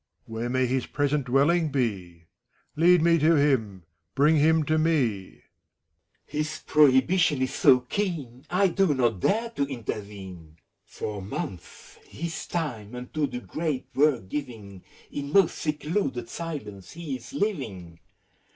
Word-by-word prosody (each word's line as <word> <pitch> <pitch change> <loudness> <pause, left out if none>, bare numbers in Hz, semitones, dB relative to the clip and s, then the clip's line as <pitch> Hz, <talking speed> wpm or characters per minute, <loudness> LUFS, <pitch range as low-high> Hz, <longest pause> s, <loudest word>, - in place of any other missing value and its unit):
Where 115 +2 -4
may 130 +1 +1
his 130 0 -1
present 145 -1 0
dwelling 150 +5 +3
bef 95 -11 -2 0.5
Lead 175 +1 +5
me 170 0 +4
to 160 +3 +4
him! 115 - +1 0.3
Bring 150 +4 +4
him 160 +2 +4
to 155 +2 +1
me! 125 - +1
FAKULUS. - - -23 0.8
His 155 +1 -4
prohibition 150 +1 +4
is 130 - -2
so 125 -1 +5
keen! 140 - -4
I 190 +2 +3
do 180 -4 +2
not 120 -6 +1
dare 230 - +1
to 185 - -1
intervene. 100 - -7 0.3
For 105 -2 -5
months, 95 -2 -7
his 165 0 -6
time 125 -10 -4
unto 140 +4 -2
the 125 - -6
great 155 -3 -3
work 135 -8 +2
giving, 105 -7 -6 0.3
In 140 0 -5
most 195 -4 +4
secluded 150 - -2
silence 135 - -7
he 160 -5 -5
is - - -13
living. 110 - -3
140 Hz, 135 wpm, -26 LUFS, 115-160 Hz, 0.8 s, Lead